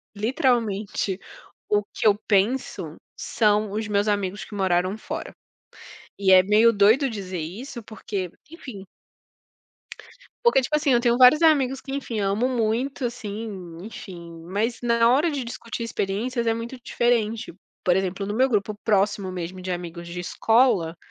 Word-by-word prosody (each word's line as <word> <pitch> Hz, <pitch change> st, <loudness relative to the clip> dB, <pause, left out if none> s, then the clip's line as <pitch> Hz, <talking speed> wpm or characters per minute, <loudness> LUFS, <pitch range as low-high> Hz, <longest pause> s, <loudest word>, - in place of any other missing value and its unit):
literalmente 215 Hz, -4 st, 0 dB, 0.5 s
o 210 Hz, 0 st, +2 dB
que -, -, +1 dB
eu 205 Hz, -, +5 dB
penso 200 Hz, -, 0 dB, 0.2 s
são 210 Hz, -2 st, +1 dB
os 215 Hz, 0 st, -3 dB
meus 205 Hz, 0 st, +1 dB
amigos 200 Hz, -1 st, -1 dB
que 210 Hz, -, -10 dB
moraram 185 Hz, +1 st, +1 dB
fora, -, -, -6 dB, 0.9 s
e 190 Hz, -1 st, +3 dB
é 185 Hz, -1 st, +8 dB
meio 215 Hz, +4 st, +5 dB
doido 225 Hz, +7 st, +4 dB
dizer 190 Hz, -5 st, -5 dB
isso, 225 Hz, -, -7 dB
porque, 200 Hz, -4 st, -5 dB, 0.2 s
enfim 250 Hz, -, -9 dB, 1.6 s
porque 475 Hz, -, +5 dB
tipo, 280 Hz, +4 st, -1 dB
assim, 295 Hz, -2 st, +2 dB
eu 240 Hz, -, +5 dB
tenho 240 Hz, 0 st, +2 dB
vários 255 Hz, +5 st, +7 dB
amigos 270 Hz, -5 st, +3 dB
que 270 Hz, -, -9 dB
enfim, 250 Hz, -6 st, -3 dB
amo 200 Hz, +5 st, +1 dB
muito, 245 Hz, +3 st, -1 dB
assim, 210 Hz, -7 st, -6 dB
enfim, 170 Hz, -5 st, -10 dB
mas 220 Hz, +6 st, -2 dB
na 235 Hz, -1 st, +3 dB
hora 295 Hz, +6 st, +3 dB
de 280 Hz, -3 st, -3 dB
discutir 235 Hz, 0 st, -6 dB
experiências 230 Hz, +3 st, -2 dB
é 225 Hz, -, +3 dB
muito 230 Hz, +3 st, -6 dB
diferente, 230 Hz, -5 st, 0 dB, 0.3 s
por 180 Hz, -1 st, +3 dB
exemplo, 190 Hz, +1 st, -1 dB
no 205 Hz, -, -3 dB
meu 260 Hz, +3 st, +3 dB
grupo 210 Hz, -1 st, 0 dB
próximo 200 Hz, -2 st, +1 dB
mesmo, 185 Hz, +1 st, -6 dB
de 185 Hz, 0 st, -4 dB
amigos 170 Hz, -1 st, -6 dB
de 175 Hz, +1 st, -6 dB
escola, 215 Hz, -3 st, +2 dB
215 Hz, 150 wpm, -24 LUFS, 190-240 Hz, 1.6 s, é